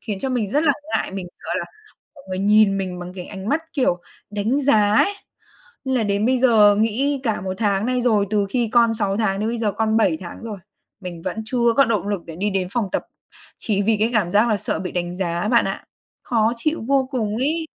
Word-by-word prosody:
khiến 210 -4 -4
cho 270 - -2
mình 240 -6 -1
rất 295 +6 +2
là 285 - +5 0.2
ngại, - - -3
mình 190 -2 -5
sợ - - -12
là - - -3 0.5
mọi 280 - -16
người 185 - -3
nhìn 205 0 +4
mình 185 -2 -4
bằng 180 +1 -7
cái 180 -2 -7
ánh 195 +1 -7
mắt, 315 +3 +1
kiểu, 250 - +1 0.3
đánh 210 +7 0
giá 215 -7 +3
ấy. 400 - +4 0.7
Nên 265 - -1
là 230 - +1
đến 205 +1 0
bây 255 0 +2
giờ 215 -5 +5
nghĩ 260 +6 +1
cả 225 -7 -1
1 185 0 -4
tháng 205 0 +1
nay 250 0 0
rồi, 215 -5 +2
từ 205 -2 +1
khi 235 0 0
con 235 -2 +4
6 200 -3 -1
tháng 200 -2 0
đến 220 - 0
bây 235 0 -2
giờ 215 -3 0
con 220 +1 0
7 190 -8 +3
tháng 175 - -8
rồi 215 -4 -6 0.4
mình 175 -3 -7
vẫn 220 - -4
chưa 235 -1 +2
có 275 - +6
động 210 -4 -1
lực 200 -4 -2
để 165 -1 -8
đi 205 +3 -1
đến 190 -2 -1
phòng 230 -5 -1
tập - - -2 0.5
chỉ 205 -3 0
vì 220 +1 +2
cái 225 +2 +2
cảm 195 -5 +2
giác 210 +4 +3
là 215 - +2
sợ - - -2
bị 180 - -5
đánh 175 0 -3
giá 175 +1 -1
bạn - - +4
ạ. - - -4 0.4
Khó 225 -1 +1
chịu 310 +5 -1
vô 270 -2 +2
cùng 215 -4 -1
ấy. 315 +6 -1
215 Hz, 245 wpm, -21 LUFS, 195-240 Hz, 0.7 s, có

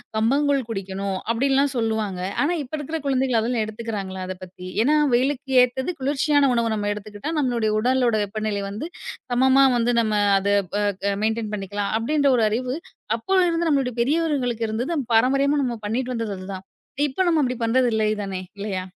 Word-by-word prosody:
கம்பங்கூழ் 275 +5 +2
குடிக்கணும் 195 -2 -3
அப்பிடின்லாம் 270 +4 +2
சொல்லுவாங்க. 220 -5 -1 0.2
ஆனா, 320 +5 +2
இப்ப 265 - -15
இருக்குற 305 +3 -4
குழந்தைகள் 260 -3 +1
அதெல்லாம் 230 0 0
எடுத்துக்கிறங்களா? 210 -4 -5
அதப் 185 0 -7
பத்தி. 180 0 -10 0.2
ஏன்னா, 295 +5 +3 0.2
வெயிலுக்கு 270 +2 0
ஏற்றது 260 +7 0
குளிர்ச்சியான 285 +1 +2
உணவ 230 -1 +1
நம்ம 205 -1 -1
எடுத்துக்கிட்டா 210 +7 -6
நம்மளுடைய 240 -6 +1
உடலோட 245 0 +2
வெப்பநிலை 205 0 -3
வந்து 215 +11 -5 0.4
சமமா 265 +2 +5
வந்து 240 +1 +1
நம்ம 215 -1 -1 0.2
அத 195 - -2 0.3
ப - - -2 0.3
க 200 - +1
மெயின்டன் 220 -1 -1
பண்ணிக்கலாம் 200 0 -3
அப்பிடின்ற 285 +5 +1
ஒரு 225 - +2
அறிவு 250 +4 -2 0.4
அப்போதுல 370 +9 +2
இருந்த 335 0 0
நம்மளுடைய 270 -5 +1
பெரியவர்களுக்கு 260 -5 0
இருந்தது. 245 +10 -2 0.2
பாரம்பரியமா 275 +5 +3
நாம 240 -3 -2
பண்ணிட்டு 255 +3 -2
வந்தது 225 -3 -3
அதுதான். 190 0 -7 0.4
இப்ப 290 +7 -1
நாம 325 -2 +3
அப்பிடி 250 -1 -1
பண்றது 250 +2 +3
இல்லை 215 -1 +2
தானே! 190 -2 -4 0.2
இல்லயா! 190 -2 -3
235 Hz, 160 wpm, -23 LUFS, 210-275 Hz, 0.4 s, சமமா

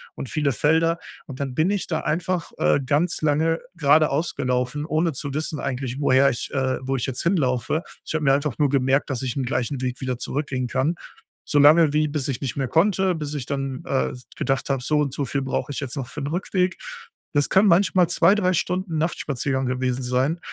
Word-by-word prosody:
und 130 - -6
viele 145 -4 0
Felder. 165 +6 +2 0.3
Und 135 -2 -8
dann 135 -2 -3
bin 155 +7 +2
ich 200 -1 -1
da 160 -2 -1
einfach, 170 +1 -2
äh, 75 - +3
ganz 150 +7 0
lange 160 +2 +2 0.2
geradeaus 155 +1 +2
gelaufen, 125 +3 -1
ohne 160 +1 +1
zu 140 0 -5
wissen 155 0 -3
eigentlich, 130 0 -3
woher 135 0 +4
ich 120 - -4
äh, 130 -1 0
wo 135 +1 -2
ich 120 - -1
jetzt 130 -3 -3
hinlaufe. 150 - +1 0.2
Ich - - -5
habe 155 -1 -1
mir 135 - +4
einfach 140 -3 -1
nur 145 -2 +2
gemerkt, 135 +1 +1
dass 130 -2 -2
ich 125 -3 -3
'n 135 - -1
gleichen 125 +2 -2
Weg 125 -1 -3
wieder 130 -2 -3
zurückgehen 130 -1 -3
kann. 135 +8 0 0.5
So 145 - +1
lange 155 +2 +6
wie 155 +1 +2
bis 145 -1 -3
ich 125 - -2
nicht 135 -5 -3
mehr 135 -3 -2
konnte, 190 +1 +2
bis 150 -2 -5
ich 135 -5 -4
dann, 135 -1 -3
äh, 135 - 0
s 125 0 -12
gedacht 135 0 -1
habe: 135 -2 0
„So 150 +3 +1
und 140 -3 -1
so 140 - -2
viel 140 +2 -2
brauche 135 +1 -2
ich - - -4
jetzt 135 0 -5
noch 130 -2 -4
für 145 - -7
'n 140 - -3
Rückweg.“ 180 +2 -1 0.6
Das 145 -1 +2
können 195 +2 +5
manchmal 180 0 +4
2, 175 +2 +4
3 185 -3 +1
Stunden 180 -1 -1
Nachtspaziergang 140 -4 -1
gewesen 125 0 -1
sein. 130 +7 0
145 Hz, 215 wpm, -23 LUFS, 130-160 Hz, 0.6 s, lange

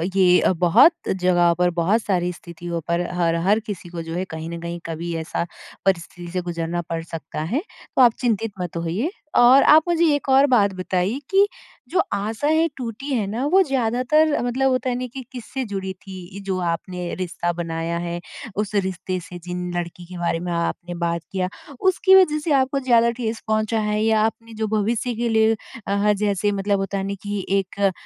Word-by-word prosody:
ये 180 -2 +5
बहुत 175 - +6 0.2
जगहों 175 -2 +3
पर 180 0 +2
बहुत 175 +6 +1
सारी 180 -3 0
स्थितियों 170 0 -6
पर 170 +1 +1 0.2
हर 170 -1 +2
हर 210 +2 +4
किसी 205 -5 -7
को 170 -1 -5
जो 165 0 -6
है 185 - -1
कहीं 160 +1 -6
न 170 0 -5
कहीं 170 0 -5
कभी 165 +1 -4
ऐसा 165 +1 -2 0.4
परिस्थिति 175 -1 -1
से 180 -1 -1
गुज़रना 170 0 -3
पड़ 165 -1 -2
सकता 160 -2 -6
है, 235 - -1 0.3
तो - - +5
आप 240 -2 +7
चिंतित 225 -2 0
मत 175 -1 -4
होइए, 180 - -1 0.2
और 250 +3 +7
आप 310 +1 +7
मुझे 340 -1 +3
एक 290 - -2
और 270 +2 +6
बात 205 -7 +3
बताइए 185 +6 -1
कि 390 +1 +5 0.4
जो 365 +3 +1
आशा 220 +7 -2
है 320 +2 +3
टूटी 255 +3 -4
है 220 -5 +1
ना 235 +7 -2
वो 385 +1 +6
ज़्यादातर 270 +3 +2
मतलब 260 +2 +1
होता 255 0 0
है 245 - 0
नहीं 250 0 -4
कि 265 - -5
किससे 255 +1 -5
जुड़ी 195 -2 -4
थी 190 0 -9
जो 190 -1 -1
आपने 175 +1 -3
रिश्ता 175 -1 -2
बनाया 165 0 -3
है, 170 0 -3 0.4
उस 210 +1 -2
रिश्ते 185 -1 -1
से, 180 0 -9
जिन 180 0 -4
लड़की 175 0 -5
के 180 0 -9
बारे 170 -1 0
में 175 0 -4
आपने 170 +1 -2
बात 170 -1 -1
किया, 185 -1 -1 0.3
उसकी 380 0 +4
वजह 305 -5 +5
से 300 +1 -3
आपको 270 0 +2
ज़्यादा 235 -3 +4
ठेस 230 -2 -4
पहुँचा 215 +1 +1
है 210 0 0
या 220 -1 +3
आपने 225 +1 -2
जो 220 0 -2
भविष्य 220 +3 0
के 235 +1 -1
लिए 220 0 +4 0.3
अ, - - -1
ह 205 +1 +3 0.2
जैसे 205 +1 0
मतलब 200 0 0
होता 195 0 -2
है 195 - -2
नहीं 200 0 -3
कि 205 -2 -3
एक 195 +1 -4
अ, 195 -1 +3
195 Hz, 200 wpm, -22 LUFS, 175-235 Hz, 0.4 s, आप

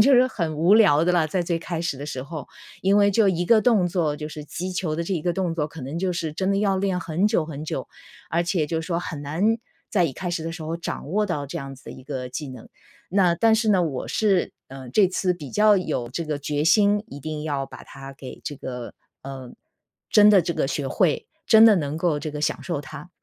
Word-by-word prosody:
就 265 +5 +6
是 250 +1 +6
很 165 -11 -3
无 175 +7 +5
聊 165 -9 +5
的 180 - +2
了， 170 -3 +3
在 180 +2 0
最 170 -1 -1
开 165 0 -4
始 140 -5 -2
的 145 - -6
时 130 -4 -4
候。 145 0 -7 0.3
因 195 +2 +3
为 205 0 +5
就 205 0 +3
一 175 -1 0
个 220 +3 +5
动 220 -7 +3
作， 165 -4 0
就 150 - -5
是 150 -1 -8
击 180 +5 -5
球 175 -4 -2
的 170 - -1
这 195 - -3
一 170 - 0
个 175 +2 0
动 185 -3 -1
作 150 -3 -1
可 155 -1 -10
能 140 +6 -4
就 185 0 0
是 160 -2 -3
真 190 +5 -1
的 195 - +2
要 200 -2 +1
练 190 -2 0
很 170 +3 0
久 210 -7 +1
很 155 -1 -7
久， - - -4 0.4
而 170 +2 +1
且 170 -3 0
就 160 +1 -2
说 170 +1 -2
很 165 -4 -5
难 185 +11 +1 0.3
在 185 -5 +3
一 140 - -1
开 180 -2 -4
始 170 -2 -2
的 165 - -4
时 165 -1 -7
候 165 +2 -3
掌 165 - -5
握 210 +3 +1
到 150 -6 -2
这 170 +5 -5
样 135 -2 -7
子 135 - -18
的 - - -8
一 130 - -11
个 130 -2 -5
技 140 +3 -5
能。 125 -3 -10 0.4
那 180 -2 +3
但 225 +5 +4
是 220 0 +1
呢， 185 -4 +4
我 135 -5 -4
是， 200 -5 +1
呃， 130 -2 -10
这 195 +7 +5
次 185 0 0
比 150 -6 -8
较 210 -1 +5
有 150 -9 -2
这 165 +6 -3
个 150 -2 -3
决 145 +1 -1
心， 205 +5 +4
一 145 - -10
定 155 +1 -5
要 145 -3 -1
把 - - -12
它 135 0 -10
给 130 - -9
这 145 - -5
个， 125 -2 -7 0.3
呃 135 -2 -8 0.6
真 210 0 +7
的 200 -3 +6
这 170 - -2
个 150 - 0
学 140 0 -2
会， 155 +3 +1 0.2
真 220 0 +8
的 220 -3 +7
能 150 -2 -2
够 165 -3 +1
这 150 0 -5
个 150 - -5
享 150 - -1
受 170 -5 -2
它。 145 +2 -10
165 Hz, 275 characters per minute, -24 LUFS, 145-190 Hz, 0.6 s, 真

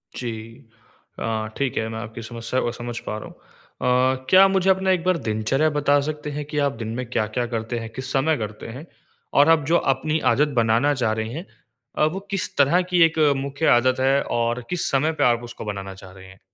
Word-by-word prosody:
जी। 120 -2 -4 0.9
अ, 110 -1 -2
ठीक 140 -2 -1
है 110 - 0
मैं 110 0 -5
आपकी 115 0 -7
समस्या 115 +2 -3
को 120 - -1
समझ 120 0 -6
पा 105 - -3
रहा - - -8
हूँ। - - -14 0.8
अ, 130 - -20
क्या 190 +1 +8
आप 195 - +4
मुझे 190 0 +2
अपना 190 0 +3
एक 180 -2 +1
बार 185 -1 +2
दिनचर्या 115 +8 +1
बता 145 -1 +2
सकते 150 -1 -5
हैं 150 +1 -4
कि 150 +1 -6
आप - - -1
दिन 110 - -4
में 125 0 -3
क्या-क्या 115 +1 -1
करते 115 +1 -3
हैं, 115 - -7
किस 130 +1 -5
समय 145 +3 +2
करते 105 -1 -6
हैं? 150 - -9 0.5
और 145 +2 +5
अब 160 -3 +4
जो 165 +4 +3 0.2
अपनी 155 +4 -1
आदत 150 +2 +2
बनाना 115 +6 +2
चाह 120 -5 0
रहे 110 - -4
हैं, 165 +6 -6 0.5
अ, - - +3
वो 190 - -3
किस 195 - -2
तरह 145 +6 +4
की 175 - +3
एक 160 0 -1 0.2
मुख्य 140 +3 -3
आदत 130 +2 +1
है 135 +1 +3 0.2
और 120 +1 -1
किस 180 -1 0
समय 145 +4 +2
पे - - +5
आप 120 -1 +3
उसको 120 -1 -8
बनाना 100 -2 -5
चाह 95 -1 -13
रहे 95 0 -14
हैं? 95 0 -16
130 Hz, 225 wpm, -23 LUFS, 115-150 Hz, 0.9 s, क्या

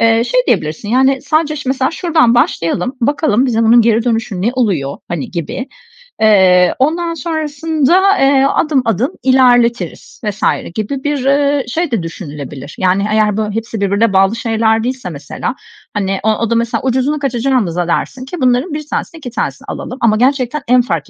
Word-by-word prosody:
eee, 230 +1 +3
şey - - +2
diyebilirsin, 155 +7 -1
yani, 265 +3 +2
"Sadece 305 +1 0
ş 280 -3 -5
mesela 265 +1 0
şuradan 320 -8 +2
başlayalım, 240 - 0
bakalım 270 -1 +1
bize 230 -2 +1
bunun 235 +2 +6
geri 230 0 +2
dönüşü 225 -5 -1
ne 230 - +2
oluyor?" 185 - -1
hani, 170 -5 -4
gibi. 180 - -5 0.5
"Eee, 185 -4 +5
ondan 335 +5 0
sonrasında, 320 +4 +1
eee, 270 0 +4
adım 295 -4 +1
adım 230 - 0
ilerletiriz." 245 -3 +2
vs. 210 -1 -4 0.3
gibi 260 +6 -3
bir, 290 -3 -2
eee, 280 0 +2
şey 320 +3 -2
de 210 -8 -1
düşünülebilir. 145 -4 -8
Yani, 190 +2 +1
eğer, 215 -1 +2
böyle, 210 -1 -2
hepsi 225 -2 -4
birbirine 200 +2 +1
bağlı 195 +3 +3
şeyler 225 -1 +1
değilse 250 -6 -3
mesela, 150 - -5 0.4
hani, 195 -2 -1
o 220 - +2
o 230 -1 -2
da 235 - +1
mesela, 235 0 0
"Ucuzuna 265 +3 0
kaçacağımıza" 240 - 0
dersin 255 +9 -2
ki: 300 +3 -7
"...bunların 255 +6 +1
1 300 0 -5
tanesini 325 - -4
2 255 -5 -7
tanesini - - -4
alalım." 255 - -6
Ama 215 -2 +3
gerçekten 265 +2 +1
en 250 0 +5
fark 170 - -3
240 Hz, 170 wpm, -15 LUFS, 210-275 Hz, 0.5 s, bunun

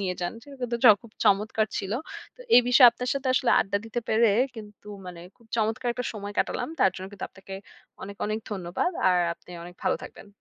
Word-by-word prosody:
নিয়ে 185 -2 -2
যান। 175 - -2
সেটা 280 +2 -13
কিন্তু 240 -1 -1
জ - - +9 0.2
খুব 230 - -15
চমৎকার 215 +2 +2
ছিল! 195 - -4 0.4
তো - - -18
এই - - +10
বিষয়ে 250 0 +8
আপনার 250 +2 -6
সাথে 275 -1 -2
আসলে 255 - +2
আড্ডা 200 +1 -1
দিতে 225 +2 -4
পেরে 225 +1 +4 0.3
কিন্তু 210 -1 -12 0.2
মানে 175 -2 -9 0.2
খুব 235 - -24
চমৎকার 225 +3 -1
একটা 250 +1 -5
সময় 205 -1 -7
কাটালাম! - - -1
তার 190 - +5
জন্য 185 - -6
কিন্তু 200 - -6
আপনাকে 195 0 -11 0.5
অনেক, 200 +1 -8
অনেক 215 +1 -2
ধন্যবাদ। 185 - -2 0.2
আর 180 - +3 0.2
আপনি - - -20
অনেক 175 +1 -11
ভালো - - +2
থাকবেন। - - -12
215 Hz, 210 wpm, -26 LUFS, 195-240 Hz, 0.5 s, এই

